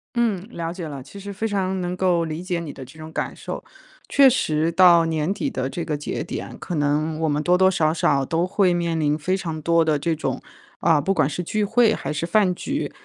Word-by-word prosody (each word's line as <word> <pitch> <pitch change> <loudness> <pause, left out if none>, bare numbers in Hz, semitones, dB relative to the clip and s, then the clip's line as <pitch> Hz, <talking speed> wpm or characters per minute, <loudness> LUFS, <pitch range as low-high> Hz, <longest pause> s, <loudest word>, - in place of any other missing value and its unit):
嗯， 215 -5 0
了 170 -5 -4
解 175 -4 -6
了， 140 -3 -7
其 200 +8 -12
实 200 +1 -7
非 220 +3 -2
常 190 -2 -1
能 180 0 -2
够 180 -3 +1
理 160 +2 -4
解 180 -2 -2
你 160 -4 -6
的 135 - -9
这 135 +5 -14
种 155 0 -9
感 - - -3
受。 - - -6 0.4
确 280 -1 +6
实 165 -10 +1
到 170 -1 +6
年 160 +2 -1
底 275 +6 -2
的 130 - -2
这 170 +2 -4
个 150 -2 -1
节 145 - -4
点， - - -6
可 175 - -6
能 150 +2 0
我 160 -1 +1
们 150 +1 0
多 180 - +4
多 190 +1 +5
少 160 -4 +1
少 140 -4 +1
都 165 +4 0
会 185 -2 +2
面 170 -2 -1
临 150 -1 +2
非 185 +5 -1
常 160 -4 -5
多 165 +1 +3
的 150 -2 +1
这 165 +2 0
种， - - -3 0.4
啊， 160 -3 +4
不 195 +7 0
管 155 -5 +2
是 180 - -4
聚 210 +5 -1
会 225 +1 +3
还 - - -4
是 150 +2 -2
饭 185 0 +2
局， 285 +10 -3
170 Hz, 260 characters per minute, -23 LUFS, 155-190 Hz, 0.4 s, 确